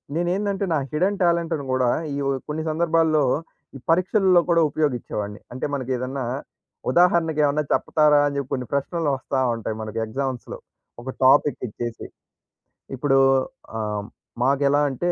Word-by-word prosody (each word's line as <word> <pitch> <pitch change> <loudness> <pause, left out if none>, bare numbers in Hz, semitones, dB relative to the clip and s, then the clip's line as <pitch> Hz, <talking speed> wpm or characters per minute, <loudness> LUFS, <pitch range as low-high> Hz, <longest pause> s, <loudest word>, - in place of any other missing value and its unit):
నేనేందంటే 195 +3 0
నా - - +2
హిడెన్ 185 +6 0
టాలెంట్‌ని 170 -4 +1
గూడా 130 -1 +2 0.3
ఈ - - -3 0.3
కొన్ని 155 +1 -3
సందర్భాల్లో 160 -1 +2 0.5
ఈ - - -12
పరీక్షల్లో 185 +1 +4
కూడా 170 -1 +4
ఉపయోగిచ్చేవాడిని. 120 -8 -2
అంటే 125 - -4
మనకేదన్నా 130 -1 -3 0.7
ఉదాహరణకు 170 -3 +3
ఏమన్నా 150 +1 +1
చెప్ప‌తార 150 -1 +3
అని 140 - -3
చెప్పి 140 -2 -4
కొన్ని 125 -2 -2
ప్రశ్నలు 150 +3 -1
వస్తా 130 +1 -2 0.2
ఉంటాయి 110 -1 -4
మనకు 110 0 -6
ఎగ్జామ్స్‌లో 130 +1 -4 0.4
ఒక 130 - -7 0.2
టాపిక్ 140 +1 +4
ఇచ్చేసి. 120 +2 -6 0.9
ఇప్పుడు 135 +1 +2 0.6
ఆహ్, 105 -1 -2 0.4
మాకెలా 140 +2 +3
అంటే 175 +7 -1
145 Hz, 125 wpm, -23 LUFS, 130-170 Hz, 0.9 s, పరీక్షల్లో